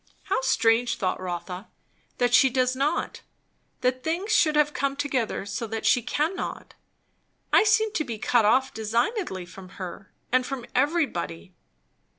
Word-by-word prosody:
How 385 -9 0
strange, 235 -2 +2
thought 185 -2 -1
Rotha, 180 +2 -5 0.5
that 245 -1 +1
she 265 +2 +6
does 255 0 +1
not 275 +3 -1 0.6
that 255 0 0
things 350 +8 -2
should 310 -7 +4
have 300 0 +3
come 275 0 -1
together 265 -8 -2
so 205 +3 -4
that 220 0 -4
she 220 +3 +4
cannot! 310 - -3 0.8
I - - +7
seem 440 0 +3
to 310 - 0
be 235 -6 -5
cut 240 +1 +2
off 260 +5 +3
designedly 225 - -1
from 185 +1 -12
her, 185 +1 -8 0.2
and 255 +1 +3
from 255 -2 -5
everybody. 260 - -1
250 Hz, 150 wpm, -26 LUFS, 215-290 Hz, 0.8 s, I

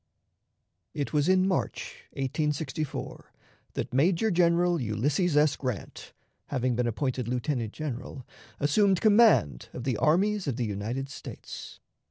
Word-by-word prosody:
It 145 +1 -3
was 150 +2 +2
in 185 0 +4
March, 185 - -3
1864, 150 +1 -3 0.4
that - - -4
Major 175 - +3
General 175 -1 +3
Ulysses 145 - +1
S. 150 -1 +4
Grant, 125 -8 -5 0.3
having 130 -3 0
been 120 0 0
appointed 125 0 -2
lieutenant 125 -2 -1
general, 135 -3 -6 0.3
assumed 190 +6 +3
command 210 - +4
of 125 - -6
the 125 -4 0
armies 190 - +2
of 135 - 0
the 120 -1 -1
United 110 +6 -3
States. 145 - -9
145 Hz, 125 wpm, -28 LUFS, 125-170 Hz, 0.4 s, in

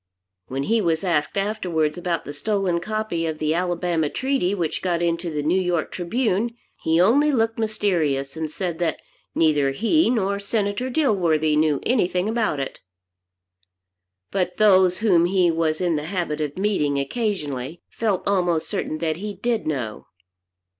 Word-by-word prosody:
When 135 +1 -3
he 225 +7 +2
was 165 -3 0
asked, 170 -2 0
afterwards, 180 -7 0
about 175 -3 -2
the 145 - -6
stolen 190 +2 0
copy 215 -4 -2
of 160 -1 -3
the 155 0 0
Alabama 175 -2 0
Treaty 260 - 0
which 170 -5 -2
got 175 -2 0
into 170 0 -1
the 150 -2 -3
"New 175 +5 +2
York 175 -3 -1
Tribune," 225 +4 -1 0.3
he 160 +1 +2
only 275 +11 +4
looked 225 -3 0
mysterious, 170 -11 0
and 160 -1 -3
said 170 0 -4
that 170 -3 0 0.4
neither 150 -4 +3
he 230 - +2
nor 200 -4 0
Senator 205 +3 -1
Dilworthy 175 - +2
knew 150 -2 +2
anything 185 -6 +1
about 220 -9 0
it. 135 - -4 1.5
But 185 -2 -1
those 190 -4 +5
whom 175 -5 +5
he 180 -1 +3
was 160 -1 0
in 175 -3 +1
the 150 - -4
habit 170 -4 -2
of 145 +1 -3
meeting 185 -8 +1
occasionally 150 - -3
felt 200 -5 -1
almost 175 -5 +1
certain 155 - -3
that 160 -1 -1
he 205 +2 -5
did 225 +1 -1
know. 125 -8 -3
175 Hz, 155 wpm, -23 LUFS, 155-205 Hz, 1.5 s, those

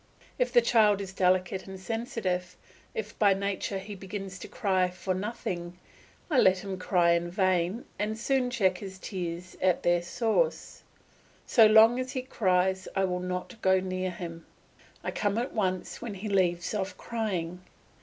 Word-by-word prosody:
If 250 -1 +1
the 240 -2 +5
child 215 -4 +4
is 195 -1 -6
delicate 185 0 +1
and 190 0 -8
sensitive, 195 -4 -3 0.4
if 210 -1 -5
by 200 -2 +5
nature 200 0 -2
he 195 +2 -7
begins 195 -1 -7
to - - -8
cry 185 -3 +1
for 185 +1 -3
nothing, 180 -3 -4 0.5
I 295 -7 +3
let 185 -3 +4
him 190 -2 -5
cry 175 -2 +3
in 170 0 +1
vain 185 +3 +1
and 215 +1 -1
soon 255 +2 +1
check 190 -7 +1
his 190 -2 -8
tears 180 -2 -5
at 185 -2 +2
their 175 0 +3
source. 230 - -1 0.6
So 225 -3 +6
long 220 +3 +7
as 255 0 -3
he 255 - -2
cries 190 -6 +1
I 195 - +2
will 180 -1 -1
not 180 +4 -5
go 190 0 +4
near 185 0 -2
him; 170 -2 -8 0.6
I - - -2
come 205 0 -1
at 245 +4 -2
once 185 -4 -2
when 225 -4 -5
he 200 +3 -6
leaves 175 -2 +1
off 190 -2 -3
crying. 185 -7 -3
190 Hz, 165 wpm, -28 LUFS, 180-215 Hz, 0.6 s, long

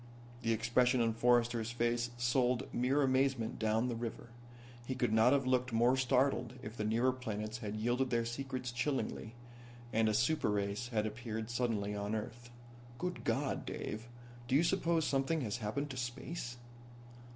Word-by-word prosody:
The 115 - +1
expression 120 +3 +3
on 115 -1 +2
Forrester's 120 -1 +2
face 120 0 0
sold 120 +1 +1
mere 130 +4 +2
amazement 130 -3 +1
down 110 +2 +2
the 120 - -2
river. 115 0 -5 0.5
He 130 +2 -3
could 115 -3 +1
not 110 +3 +6
have 135 -1 +3
looked 130 0 +1
more 120 +3 +4
startled 130 -1 +1
if 105 +2 -7
the 110 - -3
nearer 115 +4 +2
planets 110 -3 -4
had 105 -1 -4
yielded 120 +4 0
their 115 -1 +1
secrets 125 +1 -4
chillingly, 120 -3 -2 0.6
and 110 0 +3
a 105 - +1
super 135 +4 +2
race 100 +3 -1
had 110 -3 0
appeared 110 0 -4
suddenly 115 -4 0
on 105 +1 -2
Earth. 120 +2 -6 0.5
"Good 180 +4 -3
God, - - 0
Dave. 110 +3 -5 0.4
Do 130 - +2
you 150 - +5
suppose 170 -3 +2
something 140 +3 +1
has 110 -3 -2
happened 135 +6 -3
to 130 - -6
space?" 125 +1 -4
120 Hz, 160 wpm, -34 LUFS, 110-130 Hz, 0.6 s, not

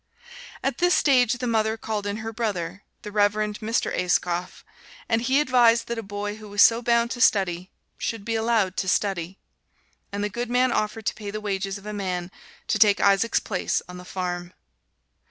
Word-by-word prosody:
At - - -1
this 355 0 +4
stage 250 -5 +4
the 245 0 -4
mother 220 -1 +1
called 215 -2 -3
in 205 +1 -2
her 225 - -4
brother, 205 -5 -3 0.2
the 210 - -7
Reverend 210 0 +1
Mr. 225 +1 -1
Ayscough, 180 0 -1 0.4
and 225 -1 +1
he 265 +4 +2
advised 245 -5 +4
that 235 -1 -4
a - - -3
boy 205 0 -5
who 215 -1 -11
was 205 0 +5
so 230 +1 +5
bound 235 0 +2
to 245 - -4
study 185 -5 +2 0.3
should 225 -3 -3
be 230 - -2
allowed 220 -4 +1
to 190 - 0
study. 190 -2 -1 0.7
And 200 0 -3
the - - +1
good 235 +3 -4
man 250 +1 +2
offered 215 0 -2
to - - 0
pay 210 -2 -7
the 215 +1 -4
wages 195 -1 -3
of 200 - -14
a 210 - -5
man 185 -3 -3 0.4
to 215 - +1
take 205 -1 +5
Isaac's 200 +3 +3
place 190 -4 -1
on 180 0 -9
the 180 - -9
farm. 180 -1 -4
210 Hz, 190 wpm, -25 LUFS, 195-230 Hz, 0.7 s, was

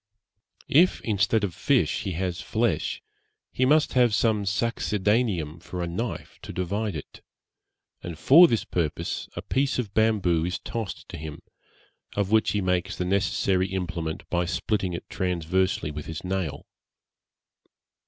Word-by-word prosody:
If, 170 +6 +4
instead 105 0 +1
of 95 -4 -1
fish, - - +1
he 95 - -2
has 90 +1 -2
flesh, 115 +6 -1 0.5
he 130 - +1
must 150 +3 +3
have 120 -4 +4
some 105 -2 +2
succedaneum 100 -5 0
for 90 0 -5
a - - -2
knife 110 +8 -5
to - - -7
divide 100 +2 -2
it; 75 - -9 0.8
and 85 -2 -6
for 170 - +8
this 115 -7 0
purpose 80 -4 -2
a - - -5
piece 135 +1 0
of 110 -6 -3
bamboo 100 -7 +2
is 90 +2 -1
tossed 115 -4 -5
to - - -6
him, 75 -1 -8 0.7
of 100 -1 0
which 110 0 +4
he 105 - +1
makes 90 +1 0
the 90 - -2
necessary 95 0 +1
implement 90 -4 -4
by 85 0 +1
splitting 95 +1 -1
it 85 - -6
transversely 90 -2 0
with 75 0 -7
his 80 -1 -6
nail. 90 -4 -3
95 Hz, 145 wpm, -26 LUFS, 85-110 Hz, 0.8 s, for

